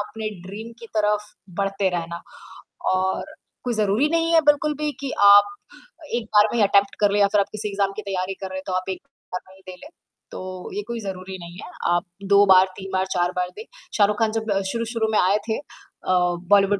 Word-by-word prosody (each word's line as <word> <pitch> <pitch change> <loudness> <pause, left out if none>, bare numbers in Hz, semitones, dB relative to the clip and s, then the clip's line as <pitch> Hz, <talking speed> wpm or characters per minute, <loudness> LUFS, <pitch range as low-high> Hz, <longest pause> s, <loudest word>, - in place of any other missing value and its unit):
अपने 215 +1 -4 0.2
ड्रीम 220 +4 -8
की 230 - -9
तरफ 210 0 +1 0.3
बढ़ते 195 -1 +1
रहना। 170 0 -5 0.7
और 190 +11 -1 0.3
कोई 245 -1 -1
ज़रूरी 215 +6 +2
नहीं 330 0 +1
है 330 - +7
बिल्कुल 295 +1 +3
भी 300 - 0
कि 275 -2 -3
आप 205 0 +7 0.6
1 235 -2 -2
बार 210 0 +8
में - - 0
ही - - +5
अटेम्प्ट 200 0 +3
कर 205 -1 +4
लें 205 - +2
या 200 - +6
फिर 210 - +5
आप - - -2
किसी 210 0 -4
एग्जाम 195 -1 0
की - - -3
तैयारी 190 -1 -2
कर 190 - -3
रहे 190 - -5
हैं 190 - -6
तो 185 - -2
आप 185 +1 -2
1 190 - -3 0.3
बार 180 - -2
में 190 - -16
ही 190 - -20
दे 185 - -7
लें 300 - -11 0.4
तो 185 -1 -7
ये 415 - -1
कोई 235 -1 -4
ज़रूरी 190 -1 -6
नहीं 170 0 -10
है। - - -9 0.3
आप 175 +3 0 0.3
2 200 0 +7
बार, 190 -1 +7
3 195 0 -7
बार 190 0 +1
4 175 0 +1
बार 180 0 -1
दें। 435 - -6 0.3
शाहरुख 210 +1 +3
खान 220 -1 +2
जब 220 -1 -2 0.2
शुरू-शुरू 230 -1 -1
में 215 - +3
आये 190 +3 +4
थे 220 - +1
अ, 390 - -6 0.4
बॉलीवुड 200 0 +5
205 Hz, 225 wpm, -23 LUFS, 190-220 Hz, 0.7 s, बार